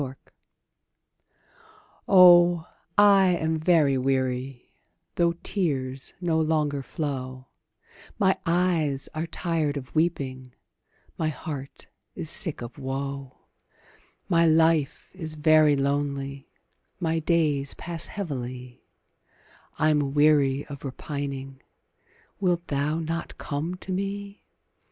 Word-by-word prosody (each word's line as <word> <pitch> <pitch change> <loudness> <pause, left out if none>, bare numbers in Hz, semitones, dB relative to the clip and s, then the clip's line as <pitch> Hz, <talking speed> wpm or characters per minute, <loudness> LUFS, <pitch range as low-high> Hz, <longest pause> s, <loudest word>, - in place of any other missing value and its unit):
APPEAL. 130 -1 -5 1.9
Oh, 175 -3 +7 0.3
I 195 -3 +6
am 160 0 -1
very 155 -5 +3
weary, 130 -1 -2 0.4
Though 170 -1 +2
tears 135 -8 -2
no 170 -3 +1
longer 150 -3 0
flow; 130 -3 -5 0.7
My 190 -1 +3
eyes 165 -5 +1
are 160 +1 -3
tired 160 -4 -1
of 130 -1 -8
weeping, 130 -6 -2 0.6
My 155 - +1
heart 140 -2 -7 0.3
is 160 - -4
sick 160 -8 0
of 120 +4 -9
woe; 135 0 -5 0.9
My 170 -2 +4
life 160 -2 +2
is 160 -4 -6
very 155 -1 +5
lonely 140 0 -2 0.5
My 165 -2 0
days 150 -4 +1
pass 170 -1 -4
heavily, 125 -9 -6 0.9
I'm 150 -3 +1
weary 145 -2 +3
of 140 -2 -10
repining; 135 -1 -6 0.8
Wilt 175 -3 0
thou 145 +2 0
not 165 +1 -4
come 155 +5 -3
to 190 +1 -9
me? 200 +2 -4
150 Hz, 100 wpm, -26 LUFS, 135-170 Hz, 1.9 s, Oh